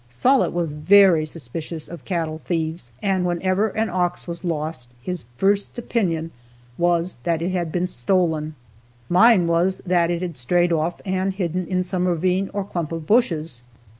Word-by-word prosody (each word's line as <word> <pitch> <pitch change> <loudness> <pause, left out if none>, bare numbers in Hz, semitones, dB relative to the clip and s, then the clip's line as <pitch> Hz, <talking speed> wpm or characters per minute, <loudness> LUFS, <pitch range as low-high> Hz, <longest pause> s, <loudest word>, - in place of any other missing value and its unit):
Sollitt 250 - +3
was 170 -3 -1
very 165 +1 +5
suspicious 155 +2 -5
of 170 - -10
cattle 165 -4 -2
thieves, 160 -6 -3
and, 190 -2 +1
whenever 185 +4 +1
an 220 +2 -1
ox 180 -1 -1
was 170 +1 -6
lost, 155 -6 -3
his 175 +2 -5
first 200 - +1
opinion 170 -9 -1 0.4
was 175 -2 0
that 165 +5 0
it 180 - -1
had 175 -3 -2
been 175 +1 0
stolen. 160 0 0 0.5
Mine 185 +1 +6
was 170 +3 +1
that 175 -2 +2
it 175 +1 -1
had 170 -4 -5
strayed 175 +8 +2
off 165 +2 -1
and 190 0 -1
hidden 180 -2 -2
in 185 -1 0
some 180 0 -1
ravine 180 +3 +1
or 200 - -2
clump 170 -5 -4
of 165 -1 -5
bushes. 165 - +1
175 Hz, 165 wpm, -22 LUFS, 160-185 Hz, 0.5 s, Mine